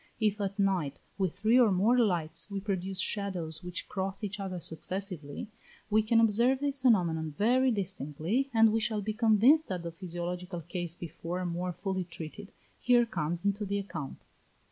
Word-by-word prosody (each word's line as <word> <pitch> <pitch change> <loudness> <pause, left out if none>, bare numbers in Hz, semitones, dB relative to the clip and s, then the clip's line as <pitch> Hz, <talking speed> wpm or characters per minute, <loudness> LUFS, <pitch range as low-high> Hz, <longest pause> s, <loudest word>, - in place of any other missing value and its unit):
If 210 -2 +1
at 200 0 -2
night, 185 -8 +1 0.2
with 190 -3 +1
three 215 +8 +3
or 235 -4 +5
more 200 +6 +3
lights, 165 -5 0
we 200 -1 -3
produce 190 -1 -2
shadows 180 -5 -1
which 180 -1 -2
cross 195 +1 -3
each 205 0 -3
other 190 -2 -4
successively, 170 -1 -3 0.4
we 215 +1 +5
can 225 +1 +3
observe 230 +4 +4
this 280 -1 -1
phenomenon 165 - +2
very 255 +5 +3
distinctly, 190 - -1
and 225 -1 +5
we 225 - +2
shall 215 -1 -1
be 215 +2 -2
convinced 235 +7 +4
that 180 -3 -4
the 170 - -4
physiological 175 0 -5
case 175 0 -4
before 170 +2 -5
more 175 +1 -2
fully 190 0 -3
treated, 170 +4 -9 0.3
here 245 -1 +4
comes 170 -3 -3
into 200 +1 +1
the 200 0 -1
account 165 -8 -5
(38). - - -32
195 Hz, 170 wpm, -30 LUFS, 175-215 Hz, 0.4 s, or